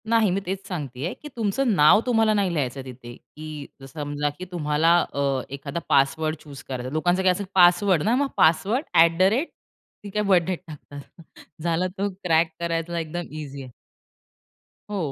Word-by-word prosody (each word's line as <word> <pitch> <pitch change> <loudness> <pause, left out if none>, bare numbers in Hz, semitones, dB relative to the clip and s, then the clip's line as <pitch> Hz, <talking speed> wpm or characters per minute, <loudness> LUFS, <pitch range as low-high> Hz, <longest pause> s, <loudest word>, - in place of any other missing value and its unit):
नाही. 225 -3 +4
मी 190 - 0
तेच 190 +2 -4
सांगतेय, 150 -3 -4
की 300 - -12
तुमचं 230 +1 0
नाव 150 +7 +6
तुम्हाला 225 -3 +3
नाही 200 -4 +1
लिहायचं 135 -4 -2
तिथे. 120 -2 -10
की 150 -3 -11
समजा 145 -1 -2
की 185 - -5
तुम्हाला 160 0 +2 0.2
अ, 140 -2 0
एखादा 140 +3 -5
पासवर्ड 150 +3 +2
चूझ 145 -2 -11
करायचा 130 -3 -6
आहे. 130 - -7
लोकांचं 175 +4 +1
काय, 185 - +5
असं 190 +3 -2
पासवर्ड 175 -1 +5
ना, 225 +4 +2
मग 280 +2 +1
पासवर्ड 200 - +3
ॲट 165 0 +5
द - - 0
रेट, 275 +9 -1 0.5
ती 205 - -7
काय 210 +2 -1
बर्थ 190 -4 +4
डेट 185 -1 -2
टाकतात. 145 -2 -10 0.6
झालं 170 +2 0
तर 200 +1 0 0.2
क्रॅक 165 -2 +3
करायला 170 0 -2
एकदम 165 +2 -4
ईझी 145 -2 -7
आहे. 130 - -11 1.2
हो, 185 -9 -2
165 Hz, 175 wpm, -24 LUFS, 145-190 Hz, 1.2 s, नाव